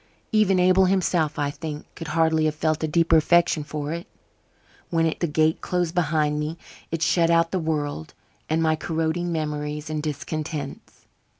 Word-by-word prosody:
Even 210 -3 +3
Abel 185 +1 +5
himself, 175 -5 +1
I 145 -1 0
think, 150 0 -6
could 165 - -8
hardly 160 0 +2
have 155 0 0
felt 155 0 0
a - - +1
deeper 165 +1 +4
affection 170 0 +3
for 150 +1 -4
it. 170 +1 -6 0.8
When 165 -1 +2
its 160 +2 -2
gate 155 +1 +1
closed 175 -2 -1
behind 150 -3 +1
me 155 +2 -3 0.3
it 165 0 -2
shut 165 -2 +3
out 165 0 +3
the 185 - 0
world 150 - -3 0.3
and 160 +1 +1
my 160 0 +3
corroding 165 +2 -2
memories 150 -1 -3
and 155 -1 -2
discontents. 150 -1 -5
160 Hz, 165 wpm, -24 LUFS, 150-170 Hz, 0.8 s, Abel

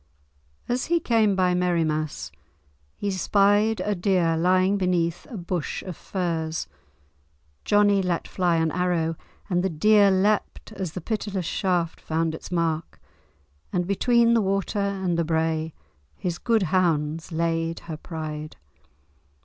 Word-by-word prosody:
As 250 +1 -1
he 340 0 +2
came 225 -8 +2
by 185 -1 +2
Merriemass 155 - -1 0.7
he 205 - -3
espied 205 +3 +2
a 210 - 0
deer 180 -3 +1
lying 185 +3 +3
beneath 175 -3 0
a 235 - -6
bush 175 -3 -3
of 185 -3 -6
furze. 165 -3 -3 1.0
Johnie 205 -1 +4
let 175 -2 -1
fly 175 -2 +1
an 160 -1 +1
arrow, 170 -2 0 0.3
and 180 -2 0
the 190 - +1
deer 200 +5 +5
leapt 200 +4 0
as 190 -6 -5
the 180 - -5
pitiless 205 -2 -3
shaft 175 -2 -1
found 160 0 -1
its 160 - -8
mark, 165 -2 -1 0.7
and 180 0 0
between 235 +4 +3
the 230 - +4
water 195 +1 -1
and 190 -4 -1
the - - +2
brae 160 0 0 0.4
his 175 -2 -4
good 225 -4 +2
hounds 160 -3 +1
"laid 165 0 -1
her 160 -2 -7
pride." 155 -2 -6
180 Hz, 135 wpm, -25 LUFS, 165-200 Hz, 1.0 s, deer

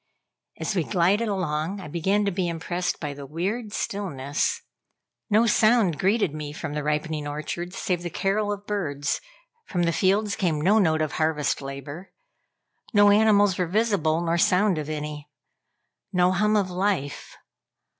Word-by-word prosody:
As 160 +6 -2
we 175 - +2
glided 195 +6 +2
along, 185 -1 -2
I 185 - -8
began 190 +7 0
to 200 - +1
be 185 -1 -1
impressed 175 +2 -2
by 150 -3 -4
the 140 -1 -9
weird 200 - -3
stillness. 145 -10 -2 0.7
No 220 +2 +4
sound 215 -7 +3
greeted 195 -4 +2
me 150 -1 -6
from 155 -1 -5
the 150 - -2
ripening 150 0 -2
orchards, 170 +5 -5
save 180 -2 -1
the 175 - -4
carol 205 +4 0
of 205 0 -5
birds; 145 -9 -2 0.5
from 175 -3 -1
the 170 0 +1
fields 200 +3 +2
came 170 -6 0
no 195 +8 +4
note 160 -5 +2
of 155 - -2
harvest 155 -3 0
labor. 140 +6 -8 0.8
No 205 0 +7
animals 205 -3 +4
were 180 - +1
visible, 180 -5 +1
nor 170 0 0
sound 185 0 +3
of 150 0 -5
any. 150 -1 -5 0.8
No 180 0 +3
hum 210 +3 +2
of 195 -3 +1
life. 180 -6 -2
175 Hz, 155 wpm, -25 LUFS, 155-205 Hz, 0.8 s, No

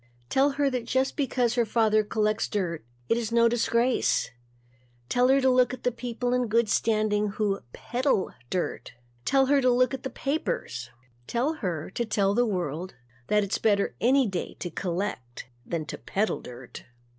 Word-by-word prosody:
Tell 275 +1 +3
her 285 0 +1
that 250 -2 -2
just 260 +2 0
because 250 -4 +1
her 245 -1 +2
father 215 -1 +2
collects 215 0 0
dirt, 175 - -2 0.2
it 230 - +2
is 230 -2 -2
no 235 0 +5
disgrace. 235 - +1 0.8
Tell 245 +1 +3
her 270 +1 +5
to 265 - +2
look 255 0 +3
at 250 - -21
the 250 - +2
people 245 +1 -3
in 250 -1 +1
good 230 +1 +2
standing 215 -1 +1
who 200 -1 -1
peddle 245 - -1 0.2
dirt. 180 - -3 0.3
Tell 270 -1 +4
her 280 +1 +3
to 255 - +4
look 250 +2 +3
at 265 - -4
the 265 - -4
papers. 235 - -3 0.4
Tell 255 +7 0
her 180 - -4
to 235 - -1
tell 200 -3 +1
the 240 +2 +2
world 180 -2 -3 0.3
that 210 0 +3
it's 200 - -2
better 205 -2 +2
any 265 +3 +4
day 190 -5 -4
to 175 - -5
collect 170 -10 -4 0.2
than 165 -2 -2
to - - -7
peddle 200 - -1
dirt. 125 0 -10
230 Hz, 175 wpm, -27 LUFS, 195-250 Hz, 0.8 s, no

